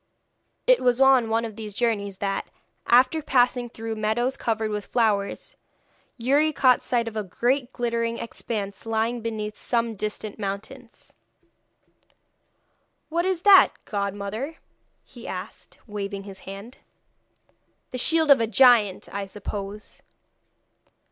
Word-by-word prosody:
It - - +5
was 245 0 +2
on 265 -4 +5
one 225 +1 +1
of 220 -2 -7
these 210 -2 -7
journeys 205 -5 -1
that, 195 0 -2 0.4
after 255 +6 +4
passing 250 -3 +2
through 225 0 -6
meadows 225 +5 0
covered 220 -4 -2
with 210 -1 -4
flowers, 210 -4 0 0.6
Youri 280 +6 +2
caught 255 -4 +4
sight 235 -2 0
of 225 - -6
a 215 - -2
great 245 +7 -1
glittering 235 -1 -2
expanse 210 -3 -5
lying 225 +2 -1
beneath 215 -2 -4
some 230 0 -1
distant 210 0 -5
mountains. 220 +5 -7 2.0
'What 340 +2 0
is 375 -2 -1
that, 390 -2 +7
godmother?' 205 +8 -4 0.5
he - - -12
asked, - - -8
waving 200 -2 -5
his 195 -1 -10
hand. 200 +6 -10 1.1
'The 255 - -3
shield 320 +2 +3
of 270 - +7
a 225 - +1
giant, 225 -4 +4
I 200 0 -4
suppose.' 205 +1 -7
230 Hz, 125 wpm, -25 LUFS, 205-250 Hz, 2.0 s, that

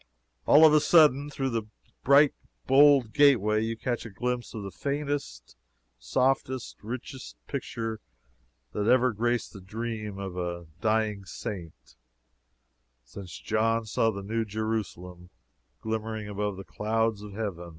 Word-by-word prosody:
All 155 +2 +8
of 155 - +7
a 155 - +7
sudden, 150 -3 +5
through 135 -2 -2
this 115 -1 -1 0.4
bright, 140 +2 +6 0.3
bold 135 -4 +5
gateway, 115 -8 +4
you 115 0 -2
catch 120 0 -2
a 115 - -8
glimpse 120 +4 -3
of 105 - -5
the 100 - -6
faintest, 140 - -4 0.4
softest, 130 - -1
richest 125 +3 -7
picture 115 -5 -4 0.7
that 105 0 -2
ever 125 +1 +4
graced 120 +2 -1
the 100 - -10
dream 110 0 -5
of 95 -2 -6
a 85 -1 -4 0.2
dying 110 -2 0
Saint, 90 -2 -8 1.1
since 85 +9 -10
John 115 +1 0
saw 115 +1 +1
the 100 -2 -5
New 115 +3 -1
Jerusalem 105 -5 -4 0.5
glimmering 110 -1 -3
above 105 -1 -3
the 95 - -7
clouds 110 +5 -1
of 105 -1 -9
Heaven. 95 -5 -5
110 Hz, 135 wpm, -28 LUFS, 100-125 Hz, 1.1 s, All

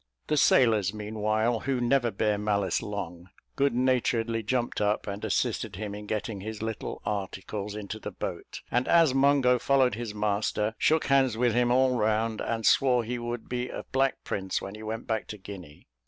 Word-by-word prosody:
The 150 - 0
sailors, 110 -8 +4
meanwhile, 110 +2 0
who 135 +1 -1
never 120 0 +2
bear 105 0 0
malice 100 -2 0
long, 90 -4 -6 0.3
good 140 -2 +2
naturedly 120 -3 +1
jumped 120 +2 -1
up, 105 +1 +1
and 100 0 -5
assisted - - -1
him 105 +1 -5
in 105 0 -8
getting 105 -1 -3
his 110 +1 -6
little 110 -1 -5
articles 100 +1 -4
into 105 +1 -6
the - - -5
boat; - - -6
and 125 +1 +1
as 165 -5 +5
Mungo 135 -2 +4
followed 135 0 +3
his 115 -1 -5
master, 105 +1 0
shook 160 0 +3
hands 135 -4 +3
with 120 -1 +2
him 120 +1 +2
all 130 0 +3
round, 110 +1 0
and 115 -1 -2
swore 125 -3 +4
he 120 +2 -3
should 120 -1 -5
be 125 0 -3
a - - -6
black 135 0 +1
prince 95 -1 -2
when 95 - -7
he 110 - -9
went 110 +1 -5
back 110 -1 -2
to 105 - -7
Guinea. 95 -7 -11
110 Hz, 185 wpm, -28 LUFS, 105-125 Hz, 0.3 s, as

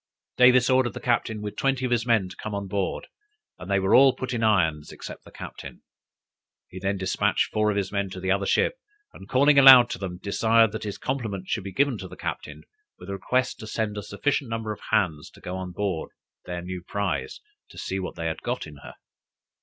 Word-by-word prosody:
Davis 125 0 +6
ordered 130 -2 +2
the - - -5
captain 110 -3 -1
with 105 - -5
twenty 135 -1 0
of 125 - -2
his 120 0 +1
men 110 -5 +3
to 90 - -11
come 105 -1 -6
on 100 -1 -4
board, 95 0 -2 0.5
and 90 - -9
they 100 - +2
were 95 0 +1
all 135 0 +7
put 130 -1 -4
in 115 - -2
irons 80 -9 +1
except - - -9
the - - -14
captain. - - -10 0.9
He 95 - -9
then 100 +1 -1
despatched 95 -1 0
four 110 0 +2
of 105 - -1
his 95 -1 -2
men 100 -1 -1
to 95 - -8
the 95 +1 -1
other 100 0 +1
ship, - - +1 0.3
and - - -13
calling 140 +2 +5
aloud 130 -3 +9
to - - -4
them, 90 -2 -5
desired 110 +3 +3
that 110 0 -6
his 105 - -4
compliments 110 -8 -4
should 110 - -1
be 95 - -6
given 140 +6 +1
to - - -7
the - - -12
captain, - - -6 0.3
with - - -9
a - - -3
request 125 +6 -1
to 110 - -8
send 110 -1 -2
a 105 - -4
sufficient 120 +6 -2
number 115 -1 -3
of 105 - -7
hands 80 -8 0
to - - -18
go 90 - -6
on 95 -1 -5
board 95 -3 -3 0.4
their 90 -1 -5
new 90 0 -6
prize, 100 +1 -3 0.3
to - - -15
see 95 - -3
what 95 - -5
they 85 - -5
had 80 -1 -3
got - - -3
in 75 -1 -12
her. 70 - -12
105 Hz, 225 wpm, -25 LUFS, 95-120 Hz, 0.9 s, aloud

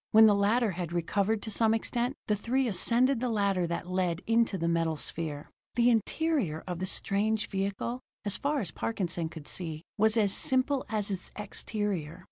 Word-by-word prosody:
When 220 +1 +8
the 210 - +6
latter 210 +3 +2
had 175 -2 -4
recovered 200 +5 0
to 220 - -3
some 225 +1 +3
extent, 240 +3 -1
the 210 - +1
three 250 +5 0
ascended 240 +5 +2
the 250 +1 -1
ladder 200 -5 +1
that 170 +1 -3
led 180 -2 -1
into 225 -3 +2
the 170 -1 -1
metal 165 -2 +1
sphere. 150 -1 -3 0.2
The 240 0 +5
interior 230 - 0
of 180 -2 -4
the 185 - -2
strange 210 +3 0
vehicle, 200 +5 -2 0.3
as 205 - +1
far 285 0 0
as 180 -6 -3
Parkinson 175 -7 -2
could 160 -3 -10
see, 160 -3 -4 0.2
was 220 +2 +4
as 205 -3 +3
simple 260 +1 +1
as 210 -2 -1
its 185 -2 -4
exterior. 200 -5 -3
205 Hz, 180 wpm, -29 LUFS, 175-230 Hz, 0.3 s, When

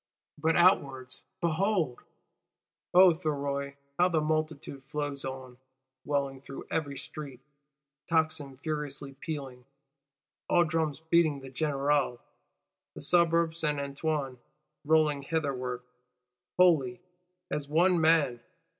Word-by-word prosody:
But 160 +2 +2
outwards 140 -8 +2 0.2
behold, 170 - +1 0.9
O 185 0 +8
Thuriot, 140 -4 -3 0.2
how 180 +1 +5
the 165 -3 +2
multitude 155 -3 -2
flows 145 -1 -4
on, 130 -2 -7 0.5
welling 140 -2 -1
through 135 - -9
every 145 -4 -2
street; 140 -2 -8 0.7
tocsin 155 -4 0
furiously 145 -2 -3
pealing, 135 -3 -6 0.9
all 175 - +5
drums 160 -2 -1
beating 160 -3 +2
the 135 -1 -10
générale: 145 -2 +1 0.8
the - - -8
Suburb 170 +1 +3
Saint 150 -3 -1
Antoine 140 -2 -2 0.5
rolling 155 -2 +3
hitherward 135 -5 -2 0.7
wholly, 150 -9 +4 0.5
as 145 -1 -2
one 170 +3 +3
man! 155 -7 +3
150 Hz, 100 wpm, -29 LUFS, 135-160 Hz, 0.9 s, O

